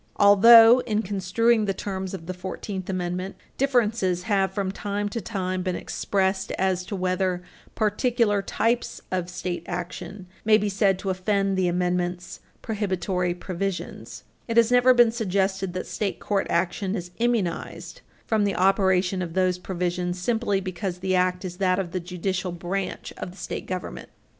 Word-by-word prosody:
Although, 225 +4 +8
in 215 -1 0
construing 210 +4 +1
the 195 -1 -1
terms 190 -1 -4
of 165 -3 -9
the 185 - -4
Fourteenth 185 +1 -6
Amendment, 185 +1 -3 0.2
differences 230 -9 +1
have 195 -2 +1
from 195 -1 -2
time 205 +1 -3
to 230 +2 -4
time 185 -2 -3
been 180 -1 -2
expressed 190 -1 -1
as 185 -1 0
to 200 - -5
whether 185 -1 -1 0.3
particular 220 -1 +1
types 230 +4 -1
of 180 -1 -1
state 180 -1 -4
action 180 +2 -6 0.2
may 215 0 +6
be 210 -1 -1
said 195 -1 +2
to 190 0 -2
offend 195 +1 0
the 185 -1 +1
Amendment's 180 0 -1 0.2
prohibitory 185 -4 -1
provisions, 185 +1 -5 0.2
it 230 -1 -1
has 235 0 +5
never 250 +1 +6
been 240 -2 +6
suggested 195 -4 -1
that 185 - -4
state 205 -3 -3
court 200 -2 -1
action 185 +3 0
is 175 -3 -5
immunized 230 -8 -2 0.2
from 220 -2 +1
the 200 -2 0
operation 190 0 +2
of 170 -1 -5
those 185 -1 +2
provisions 180 -1 -2
simply 205 +1 0
because 185 -1 -4
the 185 +1 -1
act 180 +1 +1
is 180 -1 -6
that 185 -1 +2
of 185 -3 -3
the 185 - -2
judicial 180 +1 -3
branch 180 +3 -4
of - - -5
the 180 - -14
state - - -5
government. 185 -1 -5
190 Hz, 160 wpm, -25 LUFS, 180-205 Hz, 0.3 s, Although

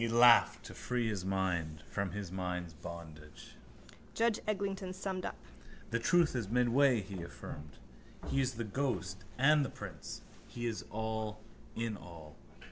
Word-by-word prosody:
He 115 - +2
laughed 120 +1 +7
to - - -8
free 120 -2 -1
his 100 -4 -2
mind 85 -5 -1
from 100 -1 0
his 100 -2 -5
mind's 90 -2 -3
bondage. 75 -5 -9 0.6
Judge 230 -1 +3
Eglinton 195 -2 -1
summed 185 -1 -3
up. - - -6 0.5
—The 115 - +2
truth 170 +4 +4
is 115 -6 -1
midway, 125 +1 +4
he 95 -2 -6
affirmed. 75 -3 -8 0.5
He 135 - +1
is 130 -1 0
the 115 - -2
ghost 105 -5 -2
and 145 +3 +6
the 135 - -2
prince. - - -7 0.2
He 120 0 -5
is 115 -2 -2
all 110 0 -2 0.4
in 115 -2 -1
all. 80 -5 -11
110 Hz, 150 wpm, -34 LUFS, 90-130 Hz, 0.6 s, laughed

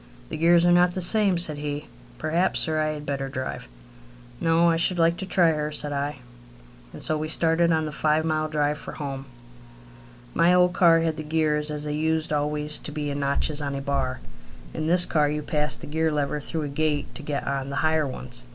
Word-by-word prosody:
"The - - -5
gears 170 +2 +4
are 175 - +4
not 175 0 +4
the - - -1
same," 195 0 +3
said 155 -4 +1
he. 145 0 -4 0.3
"Perhaps, 165 +4 +1
sir, 155 -2 +1
I 155 0 0
had 150 -1 -8
better 135 -1 -3
drive." 130 - -5 0.7
"No; 165 +1 +3
I - - +1
should 170 +2 +1
like 165 0 +3
to 190 - -5
try 175 -3 +3
her," 150 -1 -2
said 150 -1 -4
I. 145 +1 -2 0.8
And - - -10
so 155 -1 0
we 155 - -3
started 165 +1 +2
on 160 -1 +1
the 155 - -4
five 155 +1 +1
mile 155 -1 0
drive 150 -1 -1
for - - -8
home. 135 -2 -6 1.1
My 170 +2 +4
old 180 0 +4
car 165 -3 +5
had 160 -1 -1
the 155 - -5
gears 150 -1 0
as 150 -1 -3
they 150 0 -3
used 160 0 -1
always 150 0 -1
to - - -7
be 150 -1 -3
in 140 - -4
notches 140 +2 0
on 140 -1 -3
a 140 - -4
bar. 135 -2 -2 0.5
In 155 0 -3
this 175 +1 +8
car 150 -2 +1
you 150 0 -3
passed 150 -5 -1
the - - -7
gear 160 +2 0
lever 150 0 -1
through 155 +2 -4
a - - -3
gate 145 0 -2
to - - -8
get 145 -1 -4
on 140 -1 -3
the 140 - -5
higher 155 -2 +2
ones. 125 -2 -7
155 Hz, 220 wpm, -24 LUFS, 145-165 Hz, 1.1 s, this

